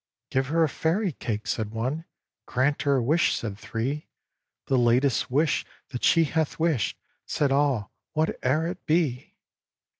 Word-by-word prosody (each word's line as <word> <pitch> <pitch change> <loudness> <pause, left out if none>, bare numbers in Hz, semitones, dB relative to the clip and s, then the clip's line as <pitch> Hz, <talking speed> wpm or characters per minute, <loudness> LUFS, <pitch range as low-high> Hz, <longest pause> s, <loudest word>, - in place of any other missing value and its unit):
"Give 130 0 +1
her 165 +3 +3
a - - +4
Fairy 170 +7 0
cake!" 110 -6 -4
said 110 -2 -1
one; 130 +9 -3 0.4
"Grant 135 +3 +1
her 140 -1 +2
a 130 - +1
wish!" 155 +7 +3
said 105 -4 -4
three; 125 +8 -3 0.6
"The 135 - +1
latest 125 +2 +3
wish 150 +4 +2 0.3
that 125 - -6
she 165 - +5
hath 160 0 -1
wished," 160 -9 +1 0.3
Said 145 -2 +1
all, 135 -6 +1 0.2
"whate'er 155 -1 +1
it 175 +2 -5
be!" 155 -6 0
140 Hz, 150 wpm, -26 LUFS, 125-160 Hz, 0.6 s, she